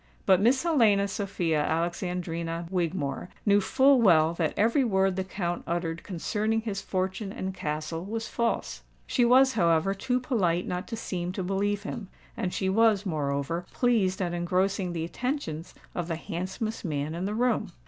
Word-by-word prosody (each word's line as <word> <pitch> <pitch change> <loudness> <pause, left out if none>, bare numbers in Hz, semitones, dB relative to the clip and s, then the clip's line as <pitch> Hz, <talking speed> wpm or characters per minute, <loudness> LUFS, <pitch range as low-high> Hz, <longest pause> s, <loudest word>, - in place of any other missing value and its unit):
But 190 -1 +5
Miss 255 +6 +3
Helena 225 -12 +4
Sophia 185 -6 -1
Alexandrina 170 +1 -2
Wigmore 175 -3 -2 0.2
knew 205 -1 +5
full 265 +5 +4
well 165 -6 +5
that 165 -2 -1
every 230 +6 +3
word 190 -5 +2
the 190 - -1
Count 175 -2 -3
uttered 170 -1 -2
concerning 215 +5 -1
his 205 -3 -3
fortune 190 +2 -2
and 190 -1 -4
castle 155 0 -3
was 225 +3 -4
false. 235 -1 -2 0.2
She 245 - +1
was, 260 +2 +6
however, 170 -2 +2
too 250 +5 -1
polite 185 -9 0
not 180 +2 -3
to 230 - -4
seem 180 -5 -3
to 190 - -3
believe 200 +2 -1
him; 215 -1 -5 0.3
and 180 - -2
she 190 - -1
was, 215 0 +3
moreover, 150 +1 -2
pleased 205 -6 +2
at 175 -1 -2
engrossing 180 +2 0
the 165 -1 -2
attentions 180 - -4 0.2
of 175 -2 -3
the 165 - -2
handsomest 185 +7 -4
man 150 -3 -2
in 175 +3 -3
the 210 +2 -2
room. 225 -4 +1
190 Hz, 165 wpm, -28 LUFS, 170-215 Hz, 0.3 s, was